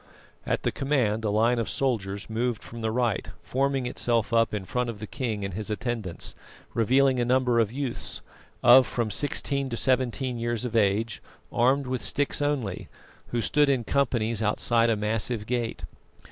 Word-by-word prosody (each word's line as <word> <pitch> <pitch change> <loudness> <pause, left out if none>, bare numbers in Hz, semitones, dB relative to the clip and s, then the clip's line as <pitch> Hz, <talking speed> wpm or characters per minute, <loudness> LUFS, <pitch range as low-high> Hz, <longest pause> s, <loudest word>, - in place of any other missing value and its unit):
At - - 0
the - - +1
command 125 -6 0
a 110 - 0
line 115 +4 +2
of 115 - -1
soldiers 100 -7 -1
moved 115 0 -2
from 115 0 -9
the 110 - 0
right, 120 -3 0
forming 135 0 0
itself 115 -3 0
up 115 -1 +3
in 105 -3 -4
front 125 +4 -1
of 115 - -5
the 105 - -6
king 110 -4 -3
and 95 - -5
his 105 +3 -5
attendants, 110 -4 -4 0.4
revealing 130 +3 +3
a - - +2
number 125 -1 +2
of 110 -2 +2
youths, 135 -1 -4 0.4
of 125 +1 +8
from 115 -3 -2
sixteen 140 +2 +1
to 115 - -3
seventeen 130 -1 0
years 120 +1 -1
of 120 -2 -4
age, 110 +1 +1 0.3
armed 135 +4 +3
with 130 -1 -2
sticks 145 0 0
only, 135 -10 -2 0.4
who 120 - -1
stood 145 +4 +3
in 130 -4 +2
companies 115 -5 0
outside 115 +2 +2
a 115 - +3
massive 105 +1 -1
gate. 120 -1 -2
120 Hz, 175 wpm, -26 LUFS, 110-130 Hz, 0.4 s, of